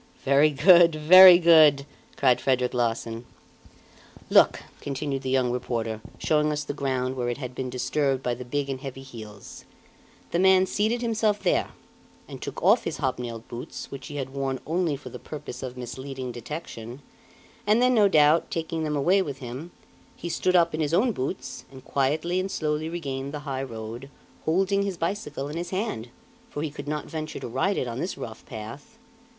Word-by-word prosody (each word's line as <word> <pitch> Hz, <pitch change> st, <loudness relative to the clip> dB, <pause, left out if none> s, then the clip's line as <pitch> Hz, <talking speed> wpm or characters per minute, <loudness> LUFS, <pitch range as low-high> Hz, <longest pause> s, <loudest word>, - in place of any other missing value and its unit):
"Very 140 Hz, +3 st, +5 dB
good! 170 Hz, +3 st, +6 dB
Very 180 Hz, +4 st, +9 dB
good!" 155 Hz, -5 st, +6 dB, 0.3 s
cried 130 Hz, -3 st, +3 dB
Frederic 125 Hz, -2 st, +1 dB
Larsan. 115 Hz, -1 st, -2 dB, 1.1 s
"Look!" -, -, +5 dB, 0.2 s
continued 140 Hz, -1 st, -3 dB
the 130 Hz, -, -4 dB
young 130 Hz, -2 st, +2 dB
reporter, 115 Hz, -3 st, -3 dB, 0.2 s
showing 150 Hz, -1 st, +1 dB
us 150 Hz, 0 st, -2 dB
the 145 Hz, -, -4 dB
ground 130 Hz, -2 st, -2 dB
where 120 Hz, -2 st, -2 dB
it 120 Hz, -, -3 dB
had 130 Hz, -3 st, -6 dB
been 130 Hz, 0 st, -4 dB
disturbed 135 Hz, +1 st, -1 dB
by 125 Hz, -, 0 dB
big 125 Hz, +4 st, -3 dB
and 135 Hz, -1 st, -4 dB
heavy 135 Hz, -1 st, -7 dB
heels; 110 Hz, -6 st, -11 dB, 0.7 s
"the 170 Hz, -, +1 dB
man 190 Hz, 0 st, +5 dB
seated 220 Hz, +5 st, -1 dB
himself 220 Hz, -3 st, 0 dB
there, -, -, +1 dB, 0.6 s
and -, -, -9 dB
took -, -, -6 dB
off -, -, +5 dB
his -, -, -3 dB
hobnailed 120 Hz, -4 st, -3 dB
boots, 120 Hz, -, -8 dB
which 140 Hz, -, -8 dB
he 145 Hz, -, -8 dB
had 135 Hz, -2 st, -4 dB
worn 135 Hz, -1 st, -2 dB
only 165 Hz, -2 st, 0 dB
for 140 Hz, -, -10 dB
the -, -, -9 dB
purpose 145 Hz, -5 st, -8 dB
of 130 Hz, -1 st, -6 dB
misleading 130 Hz, +1 st, -6 dB
detection, 120 Hz, -1 st, -8 dB, 0.6 s
and 215 Hz, +2 st, +4 dB
then 250 Hz, +1 st, +4 dB
no 215 Hz, -4 st, +5 dB
doubt, 155 Hz, -2 st, +4 dB
taking 165 Hz, 0 st, -3 dB
them 150 Hz, -1 st, -1 dB
away 180 Hz, +8 st, +3 dB
with 140 Hz, -7 st, -4 dB
him, 130 Hz, +6 st, -7 dB, 0.5 s
he 175 Hz, -, -6 dB
stood 185 Hz, +2 st, 0 dB
up 170 Hz, -2 st, +4 dB
in 155 Hz, -, -2 dB
his 155 Hz, +2 st, +1 dB
own 235 Hz, +7 st, +3 dB
boots, 130 Hz, -10 st, -5 dB
and 130 Hz, -1 st, -13 dB
quietly 155 Hz, +6 st, 0 dB
and 190 Hz, +1 st, -2 dB
slowly 155 Hz, -2 st, -2 dB
regained 140 Hz, -5 st, -4 dB
the 145 Hz, -, -5 dB
high 135 Hz, -2 st, -3 dB
road, 115 Hz, +1 st, -7 dB, 0.4 s
holding 190 Hz, +5 st, +2 dB
his 200 Hz, -3 st, -2 dB
bicycle 165 Hz, -6 st, -3 dB
in 150 Hz, +3 st, -6 dB
his 175 Hz, +1 st, -4 dB
hand, 185 Hz, -, -3 dB, 0.4 s
for 145 Hz, -, -4 dB
he 155 Hz, -, -3 dB
could 145 Hz, -, -9 dB
not 150 Hz, 0 st, -3 dB
venture 155 Hz, -1 st, -6 dB
to -, -, -6 dB
ride 135 Hz, +12 st, 0 dB
it 125 Hz, -, -1 dB
on 120 Hz, +1 st, -5 dB
this 175 Hz, +1 st, -3 dB
rough 115 Hz, -5 st, -8 dB
path. 120 Hz, -, -9 dB
145 Hz, 185 wpm, -26 LUFS, 130-170 Hz, 1.1 s, Very